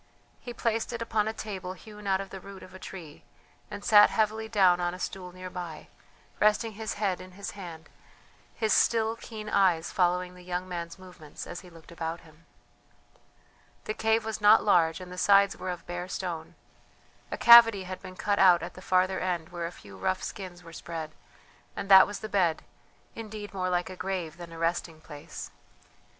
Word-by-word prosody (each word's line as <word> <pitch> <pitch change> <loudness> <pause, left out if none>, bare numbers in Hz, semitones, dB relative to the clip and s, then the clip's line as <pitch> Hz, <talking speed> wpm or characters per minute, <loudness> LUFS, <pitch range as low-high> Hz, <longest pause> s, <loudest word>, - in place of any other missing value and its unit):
He 245 - -8
placed 230 -1 -1
it 235 - -4
upon 220 -2 0
a - - 0
table 190 -4 -6
hewn 210 +2 -11
out 190 -1 +2
of 195 0 -7
the 190 - -7
root 195 0 -11
of 185 - -13
a 190 - -10
tree, 170 -6 -10 0.5
and 205 -1 -8
sat 210 -1 +8
heavily 220 0 0
down 190 -5 +4
on 175 0 -1
a - - -11
stool 180 0 -5
near 185 0 -9
by, 175 -4 -7 0.5
resting 215 +2 +3
his 220 +1 -5
head 200 -3 -1
in 185 0 -12
his 200 +2 -6
hand, 170 -5 -9 0.7
his 220 -2 +1
still 225 -1 +3
keen 220 -2 -9
eyes 185 -5 +2
following 180 0 +1
the 180 - -14
young 180 +1 -4
man's 170 -1 -6
movements 180 -5 -11
as 175 - -7
he 180 - -14
looked 165 -1 -16
about 165 0 -5
him. 165 0 -20 1.4
The 215 - -3
cave 220 0 +1
was 220 -1 -4
not 210 +1 +7
large, 165 -5 +3
and 180 -1 -10
the 180 - -6
sides 200 +1 +5
were 185 - -6
of 180 -2 -5
bare 175 +1 -5
stone. 175 -3 -5 0.7
A - - -4
cavity 230 -4 +8
had 185 0 -7
been 185 - -10
cut 205 +2 0
out 180 -3 +6
at - - -6
the 185 - -12
farther 185 0 +2
end 175 -3 -2
where 175 -1 -4
a - - -8
few 100 - -14
rough 185 - -1
skins 180 -3 -7
were 165 0 -12
spread, 165 -2 -6 0.6
and 195 - -5
that 190 -1 +9
was 205 - -6
the 215 - -4
bed, 180 -6 +1 0.5
indeed 215 -2 -8
more 185 -1 -1
like 180 +1 -1
a - - -7
grave 180 -4 -4
than 170 -1 -10
a 165 - -9
resting 165 -1 -2
place. 150 -2 -9
185 Hz, 195 wpm, -28 LUFS, 175-205 Hz, 1.4 s, that